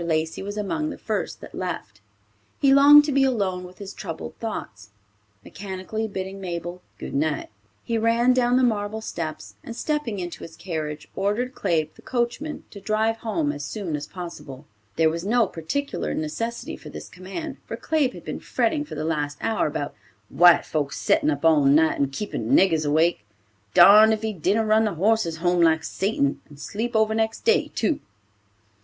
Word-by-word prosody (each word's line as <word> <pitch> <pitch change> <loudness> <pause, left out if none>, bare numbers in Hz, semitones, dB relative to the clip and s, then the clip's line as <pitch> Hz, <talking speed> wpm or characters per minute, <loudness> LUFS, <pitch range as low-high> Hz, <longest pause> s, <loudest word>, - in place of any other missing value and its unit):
Lacey 160 -1 -1
was 205 +2 -5
among 305 +10 -2
the - - -7
first 215 -3 -3
that - - -11
left. 165 - -5 0.6
He 275 -1 +5
longed 290 +2 +8
to 295 - -1
be 275 0 +3
alone 200 -8 0
with 180 0 -12
his 200 -1 -8
troubled - - -7
thoughts. 105 - -6 0.6
Mechanically 200 +3 -5
bidding 195 -1 -6
Mabel 175 0 -5 0.2
"Good - - -7
night," 150 +2 -1 0.3
he 230 -1 -1
ran 230 +3 +3
down 250 0 +3
the 260 - +3
marble 215 -2 0
steps, 155 - -5
and 230 - -7
stepping 295 -7 -2
into 175 -2 -6
his 165 - -10
carriage, 155 -4 -5
ordered 210 +6 -1
Claib, 155 -7 -1
the - - -18
coachman, 255 +5 -2
to 200 - -10
drive 220 +2 0
home 185 -11 -1
as 145 0 -6
soon 170 +2 -4
as 145 0 -5
possible. 160 -6 -9 0.3
There 160 0 +4
was 165 +1 -4
no 230 +3 +3
particular 200 - -3
necessity 230 +10 -4
for - - -11
this - - -8
command, 190 - -7
for - - -5
Claib 300 -5 0
had - - -11
been - - -4
fretting 315 -3 0
for 300 - -9
the 155 +1 -3
last 145 -2 -2
hour 225 -6 0
about 145 -1 -4 0.4
"White 175 +4 +6
folks 145 -3 -2
settin' - - +2
up 145 +1 -1
all 155 -3 +5
night 155 +3 +4
and 140 -1 +1
keepin' 210 - -1
niggers 165 - +3
awake. 160 -3 +2 0.5
Darned 210 +5 +8
if 220 0 -3
he 220 -1 -1
didn't 200 +5 +1
run 215 +1 +4
the 210 - -1
horses 195 -2 +1
home 175 +1 +1
like 160 -1 +4
Satan, 190 -9 -1
and 145 -1 -14
sleep 225 - -4
over 220 0 +3
next 220 0 -1
day, 455 -1 +2
too." 315 - 0
195 Hz, 180 wpm, -24 LUFS, 160-225 Hz, 0.6 s, longed